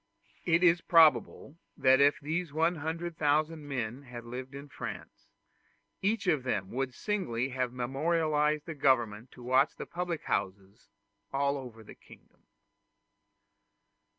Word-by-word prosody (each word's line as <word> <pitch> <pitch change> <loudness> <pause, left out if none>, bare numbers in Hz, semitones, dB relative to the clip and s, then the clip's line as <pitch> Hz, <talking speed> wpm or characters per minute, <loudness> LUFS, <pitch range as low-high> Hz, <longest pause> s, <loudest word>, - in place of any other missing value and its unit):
It 170 0 +3
is 170 -1 +5
probable 155 -1 +3 0.2
that 130 +1 +5
if 145 +1 +4
these 160 +2 -3
100,000 160 -1 0
men 125 -2 -3
had 125 -3 -9
lived 130 +3 -7
in 140 +1 -8
France, 140 - -8 0.7
each 205 +2 0
of 155 -7 +2
them 100 -7 -2
would 130 0 -3
singly 135 - -2
have 130 -2 -2
memorialized 150 +4 0
the 165 - -5
government 120 -5 +1
to 125 - -13
watch 130 +3 +2
the - - -7
public 175 -2 -4
houses 100 +3 -4 0.4
all 140 +1 +1
over 125 -5 -8
the - - -12
kingdom. - - -20
140 Hz, 125 wpm, -30 LUFS, 125-165 Hz, 0.7 s, is